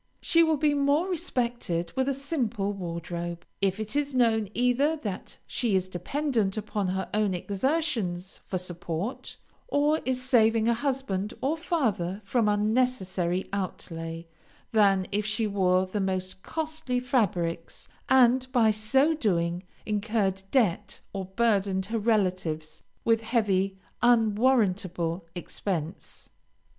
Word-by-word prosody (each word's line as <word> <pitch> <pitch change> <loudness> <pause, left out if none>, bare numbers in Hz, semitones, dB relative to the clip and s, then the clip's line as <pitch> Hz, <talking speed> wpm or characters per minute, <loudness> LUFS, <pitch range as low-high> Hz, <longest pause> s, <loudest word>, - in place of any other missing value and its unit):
She 335 - +4
will 320 -2 +3
be 295 0 +2
more 285 +4 +2
respected 240 - -1
with 265 +1 +1
a - - +1
simple 240 -8 -1
wardrobe, 170 -1 -5 0.2
if 195 +1 +1
it 215 +4 -2
is 290 -2 0
known 220 -4 +3
either 250 +6 +2
that 205 -10 -5
she 230 -5 0
is 185 -1 +1
dependent 220 - -1
upon 210 -2 -2
her 190 +1 -2
own 210 -3 +1
exertions 200 - -1
for 185 - -1
support, 175 +4 -4 0.3
or 295 -3 +2
is 260 -1 0
saving 225 -3 +3
a 235 - +4
husband 235 -6 -2
or 275 +5 0
father 225 - -1
from 225 0 +2
unnecessary 205 -5 +1
outlay, 165 -4 -4 0.5
than 200 -4 +4
if 205 +1 +1
she 215 +2 -1
wore 185 -2 +2
the 200 +2 -3
most 185 -1 -2
costly 310 -4 -2
fabrics, 180 -10 -1 0.2
and 255 0 +4
by 230 -4 +4
so 265 +9 +3
doing 175 - 0 0.2
incurred 210 -2 0
debt 210 -5 +1
or 195 -1 -3
burdened 195 -2 +1
her 225 +3 -2
relatives 185 -8 0 0.2
with 225 -1 +3
heavy, 200 -4 +1 0.2
unwarrantable 205 -7 +2
expense. 175 -1 -5
210 Hz, 125 wpm, -27 LUFS, 185-250 Hz, 0.5 s, She